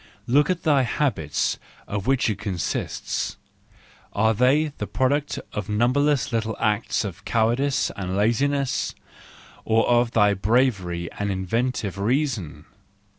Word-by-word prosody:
Look 145 +7 +3
at 180 -2 -1
thy 145 -4 +4
habits 115 - -1 0.3
of 100 +1 -4
which 135 -2 +2
it 105 -3 -1
consists: 95 -5 -3 0.8
are 110 +2 +3
they 135 +7 +3
the 105 - -3
product 130 +8 0 0.2
of 105 -1 -4
numberless 125 +5 +2
little 110 -1 -1
acts 110 +1 0
of 95 -4 -7
cowardice 120 +5 +1
and 95 -2 -3
laziness, 135 +5 +1 0.7
or 115 0 +2
of 120 0 +3
thy 105 -2 +4
bravery 95 -5 +1
and 100 0 -1
inventive 100 +1 -2
reason 120 - -1
115 Hz, 125 wpm, -24 LUFS, 100-135 Hz, 0.8 s, thy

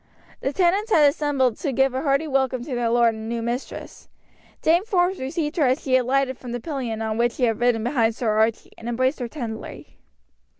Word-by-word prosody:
The 270 - -2
tenants 380 +7 +1
had 300 -7 +6
assembled 280 -4 +1
to 290 - -2
give 265 0 +2
a 260 - -2
hearty 280 +2 +1
welcome 265 -3 0
to 265 - -6
their 240 -1 0
lord 235 -1 +3
and 220 0 -7
new 230 0 -2
mistress. 240 +3 -6 0.5
Dame 340 +4 +4
Forbes 375 -3 +1
received 295 +4 -3
her 295 -5 +3
as 255 +1 +2
she 260 -2 +2
alighted 260 +1 +1
from 245 -2 -7
the 245 - -3
pillion 240 -5 -4
on 220 0 -2
which 240 0 +2
she 255 - -4
had 225 -3 +2
ridden 240 -2 +2
behind 230 -3 +1
Archie, 220 -1 +1
and 230 - -6
embraced 255 +4 0
her 245 - -3
tenderly. 230 -5 -8
255 Hz, 205 wpm, -23 LUFS, 235-290 Hz, 0.5 s, had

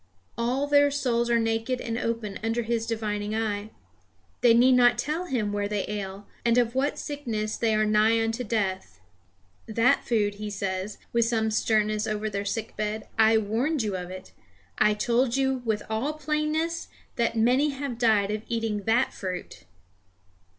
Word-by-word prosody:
All 250 +4 0
their 285 0 +5
souls 240 -4 0
are 235 - +4
naked 225 +2 0
and 230 -2 -3
open 230 -3 -3
under 225 +1 0
his 230 0 -1
divining 210 -2 -2
eye. 215 -1 -2 0.7
They 235 -2 +6
need 250 +2 +6
not 245 -1 +5
to - - -2
tell 315 +5 -2
him 220 - -1
where 205 0 -1
they 205 -2 -2
ail, 200 -1 -5 0.2
and 235 0 +3
of 235 -1 +2
what 270 +3 0
sickness 225 -7 -3
they 225 -2 +1
are 215 0 +2
nigh 215 +2 +3
unto 225 +2 -2
death. 190 - -2 0.7
That 230 +5 +3
food, 205 -3 0
he 210 - -3
says, 195 0 -3 0.2
with 235 -1 +3
some 220 -1 0
sternness 215 0 +1
over 215 0 -2
their 200 0 -3
sick 220 +2 -3
bed, 215 0 -3
I 220 0 +6
warned 230 +7 0
you 205 -3 -2
of 180 -1 -5
it; 185 0 -9 0.5
I 210 - +4
told 240 +3 +1
you 265 -1 +1
with 215 -2 0
all 225 +8 -1
plainness 310 +2 -1 0.3
that 235 -1 0
many 250 +6 +3
have 270 -4 -5
died 215 -4 +3
of 215 0 -2
eating 225 -4 -2
that 235 +4 +2
fruit! 185 -2 -6
225 Hz, 170 wpm, -26 LUFS, 210-245 Hz, 0.7 s, They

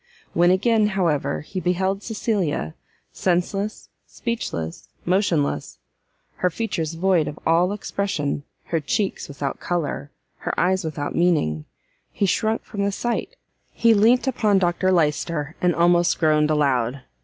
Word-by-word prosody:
When 175 +1 +4
again, 215 +3 +3
however, 160 -8 0
he 185 +5 -5
beheld 190 +2 0
Cecilia, 200 - -1 0.4
senseless, 195 +4 -1 0.2
speechless, 100 - -4 0.2
motionless, 175 -5 0 0.6
her 180 - +2
features 165 -4 -3
void 175 -2 +2
of 150 - -5
all 170 +3 +3
expression, 195 -8 -2 0.2
her 165 - -1
cheeks 195 +7 -1
without 140 -1 -4
colour, 155 -5 -2 0.3
her - - -3
eyes 185 +2 +2
without 150 -2 -3
meaning, 80 - +1 0.5
he 200 - 0
shrunk 220 +4 0
from 200 -2 -4
the 200 - +1
sight, 240 - -2 0.3
he 230 -1 +3
leant 225 +5 +4
upon 220 -6 +2
Dr 185 0 +2
Lyster, 155 -2 0
and 175 -1 +2
almost 175 0 +3
groaned 155 -1 +3
aloud. 135 -4 +1
175 Hz, 130 wpm, -23 LUFS, 150-200 Hz, 0.6 s, When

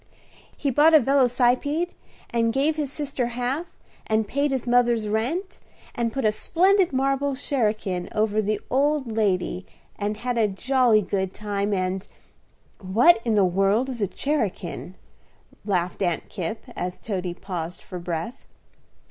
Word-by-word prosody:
"He 280 - 0
bought 310 +5 +6
a - - +9
velocipede, 270 +5 +2 0.4
and 230 -1 +2
gave 285 +5 +2
his 295 -3 -2
sister 280 -4 -2
half, 255 +8 -3 0.3
and 220 -1 +1
paid 285 +6 0
his 265 -3 -2
mother's 240 -3 +3
rent, 260 - -2 0.3
and 235 -1 -1
put 265 0 -2
a 215 - +5
splendid 370 - +3
marble 275 +1 0
cherakin 215 -9 -1
over 215 0 +1
the 210 0 -1
old 280 -2 +1
lady, 185 -4 0 0.4
and 210 +1 -2
had 245 +1 -2
a 220 - +4
jolly 235 +1 +2
good 190 -1 -2
time, 205 -1 -2
and 185 0 -1 0.4
" - - -37 0.2
"What 330 +4 +7
in 230 -2 +1
the 200 -2 +5
world 195 +7 +2
is 245 -4 -5
a 200 - +2
cherakin?" 195 - -3 0.7
laughed 180 -3 -1
Aunt 175 -3 -1
Kipp, 195 +3 -4
as 180 0 -4
Toady 185 -5 -4
paused 175 -2 -6
for 180 - -7
breath. 175 +8 -5
230 Hz, 150 wpm, -24 LUFS, 200-270 Hz, 0.7 s, a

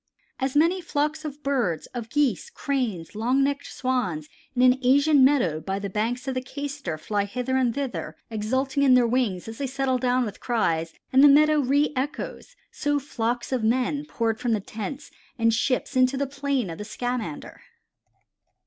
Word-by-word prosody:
"As 265 0 -1
many 335 +5 +3
flocks 310 -1 -1
of 295 0 -7
birds, 240 - 0
of 235 -2 -5
Geese, 295 - +1
Cranes, 250 - -3
long 245 +6 +1
necked 280 +1 -1
Swans, 205 - -2 0.3
in 250 - +3
an 255 +1 +5
Asian 280 +2 +5
meadow 250 - +3
by 190 +5 -3
the 200 -1 -5
banks 235 +6 -2
of 265 - 0
the 255 - -2
Cayster 280 - -5
fly 205 +4 -1
hither 250 +5 -2
and 255 -2 +2
thither 275 -3 -4 0.2
exulting 260 +6 -1
in 265 -2 +6
their 250 -1 +5
wings 230 -7 0
as 225 0 -8
they 280 - -1
settle 265 -1 0
down 250 0 +2
with 205 -2 -7
cries 165 -9 0 0.2
and 265 +2 +7
the - - +10
meadow 300 +1 +5
reëchoes, 285 - -1 0.2
so 290 0 0
flocks 240 -4 -3
of 255 -4 0
men 255 +6 +1
poured 225 -5 -1
from 240 -2 0
the 215 - +1
tents 220 +8 -7 0.3
and 230 -1 +3
ships 255 +4 0
into 255 +1 +3
the 280 - 0
plain 275 -6 -2
of 165 - -8
the - - -4
Scamander." 235 -7 -4
255 Hz, 175 wpm, -25 LUFS, 225-280 Hz, 0.3 s, the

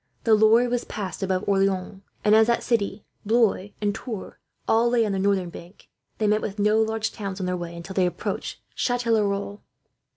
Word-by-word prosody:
The 225 - +4
Loire 220 +3 +5
was 245 0 -1
passed 195 -3 -6
above 190 0 -1
Orleans, 195 -1 0 0.2
and 210 - +5
as 220 0 +6
that 235 - +1
city, 210 -3 -1 0.2
Blois, 215 -3 +2
and 205 -1 +1
Tours 220 -3 -6 0.3
all 230 +2 +3
lay 235 -2 +3
on 210 - -1
the 195 - -1
northern 190 -3 +1
bank, 175 +4 -13 0.3
they 215 - 0
met 210 +1 +2
with 205 0 -5
no 210 +2 +3
large 220 0 -1
towns 195 -2 -6
on 185 - -2
their 180 0 -1
way, 170 -1 -6
until 170 +3 -8
they 185 -1 +2
approached 175 - -4
Chatellerault. 210 -5 0
205 Hz, 190 wpm, -24 LUFS, 195-220 Hz, 0.3 s, as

